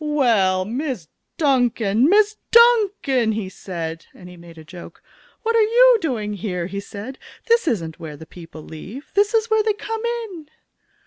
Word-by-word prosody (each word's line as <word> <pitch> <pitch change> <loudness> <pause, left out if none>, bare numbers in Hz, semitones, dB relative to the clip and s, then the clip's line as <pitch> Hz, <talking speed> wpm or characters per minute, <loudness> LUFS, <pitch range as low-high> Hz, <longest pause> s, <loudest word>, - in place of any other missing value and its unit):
"Well, 225 -11 +2
Miss 240 - -4 0.3
Duncan! 245 - +2
Miss 420 +2 +4
Duncan!" 410 - +4
he 210 -3 -4
said, 165 -4 -7
and 180 - -13
he 180 - -12
made 170 -1 -15
a 160 - -11
joke. 170 +3 -13 0.4
"What 460 0 0
are 455 - +5
you 475 +2 +5
doing 220 -9 -2
here?" 180 -3 -4
he 195 +2 -5
said. 205 +6 -9 0.3
"This 465 -5 +2
isn't 165 - -2
where 155 -3 -8
the 160 - -11
people 165 -1 -12
leave. 200 - -10
This 410 +2 +2
is 445 0 +1
where 440 0 +4
they 430 0 +1
come 445 +2 -6
in!" 450 -10 -5
245 Hz, 170 wpm, -21 LUFS, -, 0.4 s, are